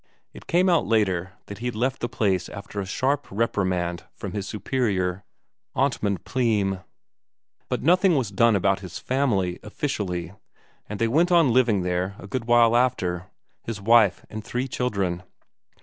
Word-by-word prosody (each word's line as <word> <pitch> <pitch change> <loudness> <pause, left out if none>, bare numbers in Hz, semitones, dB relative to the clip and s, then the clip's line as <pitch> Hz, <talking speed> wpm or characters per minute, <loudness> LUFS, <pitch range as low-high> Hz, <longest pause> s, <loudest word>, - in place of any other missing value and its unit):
It - - -13
came 180 +2 +3
out 170 -3 +3
later 95 -5 +1
that 100 -1 -9
he 120 - -3
had 120 - -3
left 130 +4 -1
the 120 - -2
place 95 -7 0
after 100 0 -6
a 95 - -6
sharp 140 +8 0
reprimand 95 -5 -1
from - - -6
his 100 -2 -4
superior, 100 -5 -1 0.5
Amtmand 115 -8 0
Pleym; 105 -7 0 0.9
but - - -2
nothing 180 +3 +4
was 125 -7 0
done 115 +3 +4
about 95 0 +2
his 95 -3 -8
family 105 -10 0
officially, 95 - -3 0.6
and 105 - -4
they 115 - +1
went 165 +9 +2
on 165 -8 +5
living 115 -7 +3
there, 90 +2 -1
a - - -10
good 115 +4 -4
while 120 -1 +5
after 95 -8 0 0.3
his 115 -3 -5
wife 110 -1 +4
and 110 0 -7
three 125 +4 -3
children. 100 -9 -1
105 Hz, 160 wpm, -24 LUFS, 95-125 Hz, 0.9 s, on